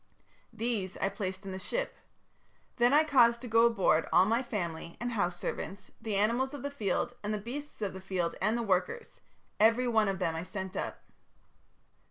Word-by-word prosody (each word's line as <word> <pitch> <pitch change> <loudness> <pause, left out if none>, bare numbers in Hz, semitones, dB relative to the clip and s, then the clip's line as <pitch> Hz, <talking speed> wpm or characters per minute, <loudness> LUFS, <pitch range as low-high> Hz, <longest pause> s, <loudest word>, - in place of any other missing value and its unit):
These 220 -5 -2
I 195 - 0
placed 190 -1 -5
in 195 - -5
the 190 - -5
ship. - - -3 0.8
Then 240 0 +4
I 300 +2 +6
caused 240 -6 +5
to 250 - -6
go 230 +1 +5
aboard 190 -8 +2
all 185 - +6
my 230 +4 +2
family 170 -8 -4
and 240 +1 -2
house 175 -6 -1
servants, 195 +1 -5
the 220 -3 -2
animals 235 +7 +1
of 280 - -8
the 285 - -3
field 245 -1 -1
and 210 - -3
the 215 - 0
beasts 245 +3 -6
of 200 - -2
the 190 - -8
field 185 -3 -2
and 215 +4 +2
the 235 - -1
workers 190 - -1 0.4
every 230 +4 +4
one 220 -3 +3
of 195 -1 0
them 165 - 0
I 160 - -2
sent 190 +1 -6
up. - - -4
215 Hz, 195 wpm, -31 LUFS, 190-240 Hz, 0.8 s, I